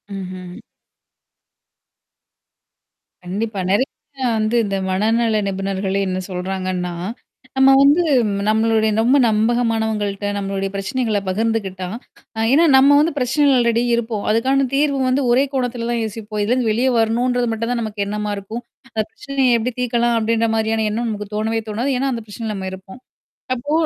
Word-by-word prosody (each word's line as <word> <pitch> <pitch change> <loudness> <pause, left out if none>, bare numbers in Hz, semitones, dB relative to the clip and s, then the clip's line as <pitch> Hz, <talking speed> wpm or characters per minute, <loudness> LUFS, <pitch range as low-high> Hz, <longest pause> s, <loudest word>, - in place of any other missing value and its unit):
ம்ஹ்ம். 185 -1 -7 2.7
கண்டிப்பா. 205 +3 -3
நிறைய. 210 +7 +3 0.5
வந்து 215 +2 0
இந்த 195 - -2
மனநல 220 +3 +1
நிபுணர்களே 195 0 -2
என்ன 185 - -2
சொல்றாங்கன்னா. 185 -1 -3 0.6
நம்ம 265 0 +6
வந்து 290 +5 +5 0.5
நம்மளுடைய 220 0 +2
ரொம்ப 255 +5 +4
நம்பகமானவங்கள்ட்ட, 220 -2 0
நம்மளுடைய 195 0 -2
பிரச்சனைகளை 220 +1 -1
பகிர்ந்துக்கிட்டா, 195 -2 -1 0.5
அ - - -2
ஏன்னா 330 +4 +5
நம்ம 280 +2 +6
வந்து 315 +3 +2
பிரச்சனைல 270 +2 +3
அல்ரெடி 235 0 +2
இருப்போம். 225 -3 -2
அதுக்கான 265 +5 +2
தீர்வு 280 -1 +2
வந்து 265 +2 +2
ஒரே 255 +3 +4
கோணத்தில 245 -3 -2
தான் 235 -1 0
யோசிப்போம். 215 -1 -5
இதுலேருந்து 240 +2 +1
வெளியே 245 +5 +2
வரணுன்றது 240 +2 +1
மட்டும் 230 +2 -2
தான் 240 -1 -1
நமக்கு 210 -2 -3
எண்ணமா 210 +1 -3
இருக்கும். 215 +4 -6 0.3
அந்த 220 -1 0
பிரச்சனைய 270 0 0
எப்படி 245 +3 -2
தீர்க்கலாம் 240 -1 +1
அப்படின்ற 230 +1 +1
மாரியான 220 0 0
எண்ணம் 235 +3 -2
நமக்கு 210 -1 -4
தோணவே 225 +1 -1
தோணாது. 235 +6 -1
ஏன்னா, 275 +1 0
அந்த 230 -2 -5
பிரச்சனைல 215 +1 -5
நம்ம 190 -1 -5
இருப்போம். 190 +5 -11 0.6
அப்போ 270 +4 -5
225 Hz, 140 wpm, -20 LUFS, 205-245 Hz, 2.7 s, நம்ம